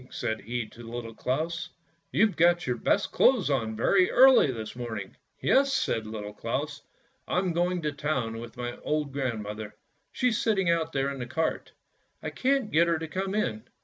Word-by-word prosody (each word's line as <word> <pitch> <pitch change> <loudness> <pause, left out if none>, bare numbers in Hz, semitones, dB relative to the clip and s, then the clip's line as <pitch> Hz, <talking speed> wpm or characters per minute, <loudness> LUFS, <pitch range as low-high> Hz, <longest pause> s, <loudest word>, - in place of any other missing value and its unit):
said 110 -2 -3
he 120 +1 -3
to 110 +2 -14
Little 115 0 -6
Claus; 165 +9 -2 0.4
"you've 215 0 +3
got 175 +1 +4
your 125 - 0
best 200 - +1
clothes 235 - +4
on 115 -5 0
very 180 - +3
early 260 - +7
this 110 -2 -6
morning! 110 -5 -6
" - - -49
" - - -43
Yes," 275 +1 +3
said 110 - 0
Little 105 -1 -6
Claus; 140 +7 -3 0.2
" - - -39
I'm 180 -1 0
going 175 0 0
to 150 - 0
town 135 -6 -2
with 115 +1 -9
my 120 0 -4
old 150 -2 -2
grandmother, 110 -6 -4 0.4
she's 250 -3 +1
sitting 195 -6 +2
out 165 -1 0
there 135 -1 0
in 135 - -6
the 120 - -4
cart, 160 +6 -2 0.5
I - - -3
can't 265 -4 +1
get 170 +2 +4
her 170 -1 +2
to 160 0 -5
come 190 +5 -3
in. 110 - -1
145 Hz, 190 wpm, -28 LUFS, 115-175 Hz, 0.5 s, early